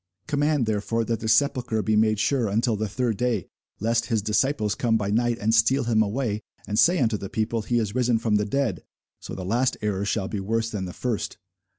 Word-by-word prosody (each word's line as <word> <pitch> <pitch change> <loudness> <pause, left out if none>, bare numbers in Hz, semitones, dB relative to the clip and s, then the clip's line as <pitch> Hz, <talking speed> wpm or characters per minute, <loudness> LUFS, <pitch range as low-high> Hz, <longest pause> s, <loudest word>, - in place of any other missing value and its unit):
Command 145 -3 +1
therefore 110 +2 -1
that 115 -1 -1
the 110 - -4
sepulchre 120 -2 +2
be 110 - +1
made 110 -1 +3
sure 125 -1 +1
until 115 +3 +1
the 110 +1 -2
third 115 0 -1
day, 120 -5 0 0.3
lest 115 +2 0
his 110 -3 0
disciples 110 0 +1
come 115 -2 +1
by 100 -2 -2
night, 120 +2 +1
and 110 +1 0
steal 115 +5 +4
him 115 -2 +2
away, 110 0 -1 0.2
and 105 0 -1
say 175 +2 +5
unto 115 -7 +1
the 100 -1 -7
people, 110 +1 -1
He 120 +3 0
is 110 -3 -1
risen 125 -2 +2
from 110 -2 +1
the 105 - 0
dead: 115 -4 -1 0.4
so - - -8
the 95 - -6
last 120 +6 +1
error 100 -2 -1
shall 100 -1 -1
be 105 - -3
worse 115 +3 -1
than 100 -3 -3
the 90 - -7
first. 120 -4 -3
110 Hz, 220 wpm, -25 LUFS, 105-120 Hz, 0.4 s, say